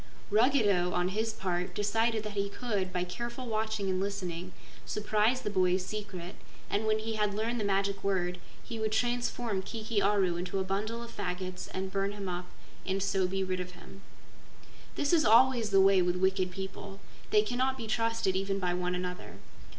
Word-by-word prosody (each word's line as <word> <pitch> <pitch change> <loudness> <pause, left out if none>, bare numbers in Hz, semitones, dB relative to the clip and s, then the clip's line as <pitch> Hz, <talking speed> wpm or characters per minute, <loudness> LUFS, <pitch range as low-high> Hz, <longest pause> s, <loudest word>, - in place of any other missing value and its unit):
Ruggedo, 210 -6 +4
on 180 +1 +1
his 220 +3 0
part, 180 -4 -2
decided 225 +2 +1
that 215 - -4
he 200 0 -1
could, 200 -5 -2
by 180 -1 0
careful 235 +8 -5
watching 220 -3 -1
and 185 0 0
listening, 185 -3 -3 0.3
surprise 215 +4 +1
the 210 - -2
boy's 185 -1 +2
secret, 200 -4 -5 0.4
and 215 +2 +1
when 215 0 +3
he 220 0 -3
had 210 -1 +1
learned 230 +3 -1
the - - -1
magic 195 0 0
word 180 -2 0 0.2
he 230 - -6
would 220 -1 0
transform 240 -3 0
Kiki 220 +1 -2
Aru 195 -3 +2
into 180 +2 -3
a 190 - +1
bundle 215 +5 -2
of 235 0 -10
faggots 185 -1 -4
and 190 0 -3
burn 195 +1 0
him 200 -2 -5
up 180 0 -3 0.4
and 190 0 -1
so 195 -2 +2
be 195 +1 -1
rid 185 -1 -1
of 180 0 -5
him. 195 +2 -13 0.9
This 285 +3 +1
is 325 -2 +5
always 235 -1 +5
the 195 -1 +5
way 195 -1 +6
with 180 0 +1
wicked 190 0 +2
people. 195 +1 -7 0.3
They 210 0 +5
cannot 255 +4 0
be 230 - -5
trusted 225 -3 +1
even 195 +1 0
by 180 -2 0
one 180 0 -1
another. 180 0 -5
200 Hz, 185 wpm, -31 LUFS, 185-220 Hz, 0.9 s, way